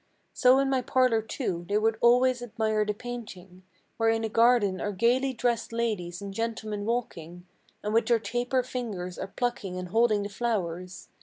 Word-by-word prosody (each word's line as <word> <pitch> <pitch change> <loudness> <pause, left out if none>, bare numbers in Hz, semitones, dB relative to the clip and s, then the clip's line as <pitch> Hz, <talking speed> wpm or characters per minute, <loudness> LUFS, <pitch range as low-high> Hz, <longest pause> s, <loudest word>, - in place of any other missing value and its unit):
So 255 +1 +5
in 275 0 +2
my 265 -1 +1
parlor, 250 -3 +2
too, 215 -6 -3
they 205 - +2
would 220 +1 +1
always 250 +1 +4
admire 220 -2 0
the 210 - -1
painting, 200 -6 -8 0.4
Where 225 -1 +2
in 225 0 +1
a 220 - -1
garden 225 -5 +3
are 205 - -1
gaily 245 +7 +2
dressed 240 -2 -1
ladies 210 -6 -2
and 200 -1 -6
gentlemen 220 -2 -3
walking, 180 -7 -4 0.4
And 210 +1 -2
with 230 - +3
their 240 -2 +4
taper 245 +4 -1
fingers 210 -8 -5
are 190 - -4
plucking 200 -4 -3
and 180 -1 -5
holding 220 0 +3
the 200 - -4
flowers. 185 -5 -3
225 Hz, 175 wpm, -27 LUFS, 195-240 Hz, 0.4 s, So